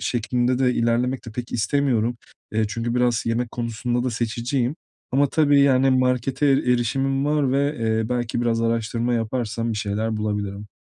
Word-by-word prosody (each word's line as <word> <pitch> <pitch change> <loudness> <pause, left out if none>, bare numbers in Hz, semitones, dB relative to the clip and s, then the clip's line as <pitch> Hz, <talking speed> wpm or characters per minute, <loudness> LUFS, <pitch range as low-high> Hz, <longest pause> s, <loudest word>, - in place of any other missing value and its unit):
şeklinde 125 +1 0
de 125 -2 +2
ilerlemek 120 +3 0
de 115 - -8
pek 120 +2 -6
istemiyorum. 120 -1 +1 0.4
Eee, 110 0 +1
çünkü 115 +2 -3
biraz 120 -2 +1
yemek 115 +1 -1
konusunda 120 +1 -2
da 125 - 0
seçiciyim. 120 +4 -1 0.4
Ama 140 +2 +4
tabii, 145 -3 +4
yani, 135 -1 +4
markete 130 +2 +1
erişimim 135 +1 +1
var 145 -3 +1
ve, 140 +2 +1
eee, 110 -1 0
belki 120 -1 -1
biraz 115 -1 +1
araştırma 115 +1 0
yaparsam 115 0 -2
bir - - -4
şeyler 110 +2 -2
bulabilirim. 105 -1 -3
120 Hz, 155 wpm, -23 LUFS, 115-130 Hz, 0.4 s, Ama